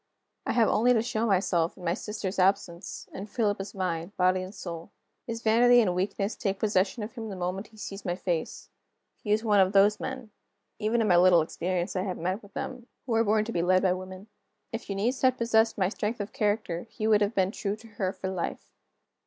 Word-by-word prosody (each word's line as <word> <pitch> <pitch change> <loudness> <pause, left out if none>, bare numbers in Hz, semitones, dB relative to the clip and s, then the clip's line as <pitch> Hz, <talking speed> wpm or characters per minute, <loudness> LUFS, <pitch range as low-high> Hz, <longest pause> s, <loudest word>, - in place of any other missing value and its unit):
I - - +1
have 230 -3 +4
only 240 +4 +4
to 225 -2 +2
show 230 -1 -1
myself, 180 -4 +1
in 180 - -12
my 170 - +1
sister's 200 -1 -4
absence, 185 -1 0
and 200 +3 -7
Philip 205 -3 0
is 195 +1 -8
mine 180 -1 -3
body 185 0 +3
and 185 +1 -6
soul. 170 -5 -7 0.4
His 230 0 -5
vanity 240 +2 +6
and 220 -5 +3
his 175 - -1
weakness 195 +3 -1
take 195 -2 -2
possession 205 +1 +1
of 215 - -7
him 225 -3 -6
the 195 - -5
moment 185 +3 -3
he 220 - -20
sees 195 -1 -7
my 175 -2 -1
face. 175 -3 -3 0.5
He 210 - -2
is 215 +1 +2
one 210 -3 +4
of 190 +1 +4
those 205 +2 +5
men 260 -4 -6 0.5
even 225 +2 +1
in 220 - +1
my 175 -3 +5
little 175 -2 +6
experience 180 +3 -2
I 185 - +1
have 185 -1 -3
met 185 +6 -2
with 200 -1 -18
them 250 -2 -5 0.2
who 245 - -2
are 225 0 +4
born 215 0 +2
to 230 - -4
be 170 - 0
led 185 +2 +3
by 185 -2 +3
women. 185 +1 -8 0.5
If 225 -1 -6
Eunice 215 +7 -1
had 255 -1 +3
possessed 225 -1 +2
my 190 -2 +2
strength 215 +2 -3
of 205 0 -5
character, 210 -7 -1
he 215 - -5
would 215 -1 +4
have 205 +2 +1
been 190 0 +2
true 200 -1 -3
to 225 +1 -15
her 200 -4 -2
for 190 - -6
life. 185 -2 -4
200 Hz, 225 wpm, -28 LUFS, 185-220 Hz, 0.5 s, vanity